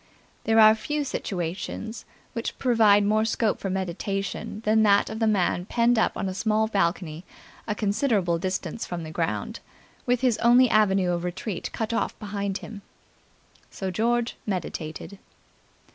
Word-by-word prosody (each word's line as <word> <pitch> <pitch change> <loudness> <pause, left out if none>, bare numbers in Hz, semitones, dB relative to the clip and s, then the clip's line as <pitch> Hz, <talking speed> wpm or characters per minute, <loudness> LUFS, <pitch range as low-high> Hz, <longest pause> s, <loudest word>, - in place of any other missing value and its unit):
There 225 0 +4
are 215 0 +9
few 295 +7 -2
situations 195 0 -4 0.3
which 230 -2 -4
provide 220 -5 +4
more 215 +1 +2
scope 220 -1 0
for 195 - -3
meditation 190 +3 -3
than 220 +1 +4
that 205 -1 +4
of 220 - -5
the 225 - +2
man 180 -4 +1
penned 235 0 +2
up - - +1
on - - -2
a 190 - -3
small 215 +2 +1
balcony 170 -5 -1 0.4
a 210 - -1
considerable 200 -5 +1
distance 190 +5 -3
from 175 -2 -5
the 155 - -7
ground, 165 0 -2 0.5
with 245 0 +2
his 250 -4 +2
only 245 +1 +5
avenue 195 -4 +3
of 175 0 -2
retreat 180 +2 -4
cut 220 0 -3
off - - -1
behind 200 -2 -3
him. 210 -2 -9 0.9
So 190 -1 -4
George 235 +4 0
meditated. 180 0 -5
205 Hz, 150 wpm, -25 LUFS, 185-225 Hz, 0.9 s, are